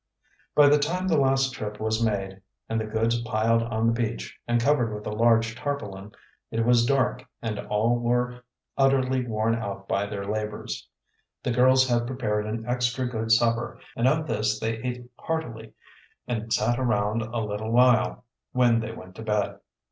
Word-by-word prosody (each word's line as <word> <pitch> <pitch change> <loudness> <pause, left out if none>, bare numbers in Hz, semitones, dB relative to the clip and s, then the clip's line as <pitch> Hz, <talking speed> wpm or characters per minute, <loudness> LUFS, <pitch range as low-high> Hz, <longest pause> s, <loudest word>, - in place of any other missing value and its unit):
By 145 -1 +7
the 145 +1 +5
time 180 +6 -1
the 170 - +3
last 135 -1 +2
trip 105 -2 -6
was 110 +1 0
made 95 -3 -2 0.3
and 115 0 -1
the 110 - -4
goods 115 +2 0
piled 115 0 +1
on 115 -1 -1
the 115 - +3
beach 115 -1 -3
and 120 0 +2
covered 120 -2 +2
with 105 - -8
a - - -3
large 115 +1 +3
tarpaulin, 105 -8 -5 0.4
it 115 0 -1
was 120 -1 +4
dark 135 -1 +1 0.2
and 110 -2 -3
all 115 +3 +1
were 125 +1 0 0.3
utterly 130 -1 +2
worn 110 0 +1
out 100 -3 -4
by 100 +1 0
their 100 -1 -5
labors. 105 0 -4 0.5
The 125 - 0
girls 130 +2 +5
had 120 -1 +1
prepared 105 -5 -1
an 110 +1 -4
extra 125 +1 0
good 115 -2 -3
supper, 115 +1 +2 0.2
and 120 - +2
of 155 +3 +2
this 105 -4 0
they 115 0 -2
ate 125 +1 -5
heartily 115 -9 -4 0.5
and 120 -3 -1
then 115 - -10
sat 120 +3 +1
around 110 -3 +1
a 115 +2 -4
little 105 +1 -4
while, 125 0 +3 0.3
when 120 -2 +4
they 110 0 -4
went 95 -4 -11
to - - -7
bed. 105 -2 -1
115 Hz, 180 wpm, -26 LUFS, 110-125 Hz, 0.5 s, By